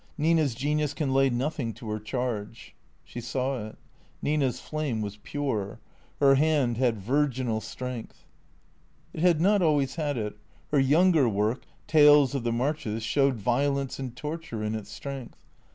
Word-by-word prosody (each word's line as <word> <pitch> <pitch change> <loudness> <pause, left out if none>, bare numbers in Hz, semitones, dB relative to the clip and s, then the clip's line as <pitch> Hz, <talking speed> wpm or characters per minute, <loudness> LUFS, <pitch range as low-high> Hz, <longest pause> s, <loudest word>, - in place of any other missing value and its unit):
Nina 160 0 +3
's 120 - -5
genius 145 +2 -1
can 145 -5 -1
lay 135 0 +4
nothing 125 -1 -2
to 115 +2 -11
her 110 - -2
charge." 115 -1 -4 0.3
She 120 - -8
saw 130 -2 -2
it. 110 - -12 0.4
Nina's 145 -4 0
flame 145 -8 -3
was 105 0 -6
pure. 115 -7 -3 0.4
Her 140 -1 +6
hand 140 -5 +2
had 120 -3 +2
virginal 125 0 0
strength. 120 +2 -7 0.9
It - - -7
had 175 -3 +4
not 200 +4 +3
always 145 -4 +1
had 145 -4 -1
it. 105 -2 -4 0.3
Her 145 - +3
younger 150 0 +4
work, 105 +4 -1
" - - -34
Tales 145 -2 +7
of 135 -4 -2
the 120 - 0
Marches," 115 -3 -2
showed 135 +2 +2
violence 135 +5 0
and 130 -3 -5
torture 150 -6 -5
in 105 0 -1
its 110 -2 -5
strength. 135 -3 -8
135 Hz, 160 wpm, -27 LUFS, 115-150 Hz, 0.9 s, Tales